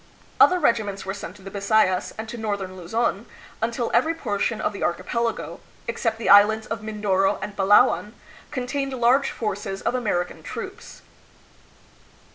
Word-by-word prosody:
Other 365 Hz, -, +7 dB
regiments 220 Hz, -, 0 dB
were 190 Hz, -, -3 dB
sent 195 Hz, -2 st, -8 dB
to 200 Hz, -, -16 dB
the 195 Hz, -, -8 dB
Bisayas 200 Hz, -2 st, +2 dB
and 220 Hz, 0 st, -5 dB
to 235 Hz, -, -7 dB
northern 200 Hz, -4 st, -3 dB
Luzon, 200 Hz, +4 st, -2 dB, 0.3 s
until 235 Hz, +1 st, -1 dB
every 325 Hz, +1 st, +3 dB
portion 220 Hz, -5 st, -1 dB
of -, -, -1 dB
the -, -, -8 dB
archipelago, 230 Hz, +7 st, -2 dB, 0.3 s
except 225 Hz, -2 st, -1 dB
the 225 Hz, -, -4 dB
islands 210 Hz, +2 st, +6 dB
of 225 Hz, -2 st, -4 dB
Mindoro 205 Hz, -3 st, 0 dB
and 205 Hz, -, -6 dB
Palawan, 205 Hz, +1 st, +4 dB, 0.4 s
contained 270 Hz, +1 st, -3 dB
large 255 Hz, +2 st, +3 dB
forces 200 Hz, -3 st, -4 dB
of -, -, 0 dB
Amer 210 Hz, -8 st, 0 dB
ican -, -, -14 dB
troops. -, -, -8 dB
215 Hz, 150 wpm, -24 LUFS, 195-235 Hz, 0.4 s, Other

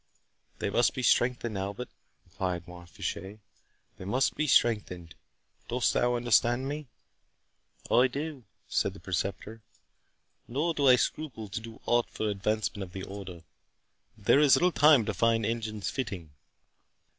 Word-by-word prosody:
"They -, -, -2 dB
must 120 Hz, +4 st, +2 dB
be 130 Hz, -, -3 dB
strengthened, 120 Hz, -4 st, +2 dB
Albert," 100 Hz, +5 st, -5 dB, 0.4 s
replied 90 Hz, -1 st, -4 dB
Mont 90 Hz, 0 st, -12 dB
Fitchet, 95 Hz, +5 st, -5 dB, 0.6 s
"they -, -, -9 dB
must 125 Hz, +7 st, +1 dB
be 155 Hz, -, -1 dB
strengthened. 95 Hz, -, +1 dB, 0.5 s
Dost 125 Hz, +1 st, +1 dB
thou 120 Hz, 0 st, +2 dB
understand 120 Hz, +2 st, +2 dB
me?" 145 Hz, 0 st, -5 dB, 1.0 s
"I 125 Hz, +2 st, +6 dB
do," 140 Hz, -1 st, -5 dB, 0.2 s
said 100 Hz, -, 0 dB
the -, -, -11 dB
Preceptor, 100 Hz, +4 st, -4 dB, 0.9 s
"nor 150 Hz, +7 st, -1 dB
do 145 Hz, -3 st, +1 dB
I 125 Hz, -, +8 dB
scruple 120 Hz, -5 st, -3 dB
to 115 Hz, -, -4 dB
do 115 Hz, 0 st, -11 dB
aught 120 Hz, 0 st, +2 dB
for 110 Hz, -, -3 dB
advancement 105 Hz, +1 st, -2 dB
of 90 Hz, -2 st, -7 dB
the 95 Hz, -, -6 dB
Order—but 95 Hz, -4 st, -8 dB, 0.7 s
there 105 Hz, +6 st, +4 dB
is 145 Hz, -2 st, +6 dB
little 180 Hz, +1 st, +3 dB
time 145 Hz, -7 st, +5 dB
to 105 Hz, -, -2 dB
find 115 Hz, +2 st, +2 dB
engines 110 Hz, -2 st, -3 dB
fitting." 95 Hz, -, -5 dB
115 Hz, 145 wpm, -29 LUFS, 100-125 Hz, 1.0 s, I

